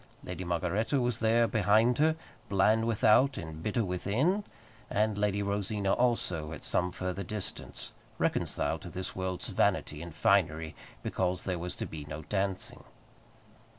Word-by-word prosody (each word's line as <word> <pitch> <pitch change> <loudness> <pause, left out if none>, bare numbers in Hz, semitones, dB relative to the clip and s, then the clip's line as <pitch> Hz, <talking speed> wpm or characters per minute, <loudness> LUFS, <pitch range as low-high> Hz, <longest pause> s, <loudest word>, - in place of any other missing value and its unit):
Lady 90 +1 -5
Margaretta 90 - 0
was 125 -1 0
there 115 +1 +4
behind 110 +4 +3
her, 155 +1 +4 0.3
bland 110 +3 +3
without 115 +4 +4
and 80 -1 -6
bitter 105 +4 0
within; 115 - +1 0.5
and 105 +1 +1
Lady 100 0 +1
Rosina 100 0 0
also, 90 -11 +1
at - - -9
some 90 0 +1
further 90 +1 -3
distance, 100 +1 -5 0.2
reconciled - - 0
to - - -7
this 95 0 -4
world's 95 -1 -3
vanity 75 0 +1
and 85 -2 -8
finery 80 -5 +2 0.3
because 90 -1 -1
there 90 -2 -2
was 90 +1 -3
to - - -3
be 75 -2 -7
no 75 +1 -6
dancing. 95 +3 -2
100 Hz, 145 wpm, -31 LUFS, 90-110 Hz, 0.5 s, there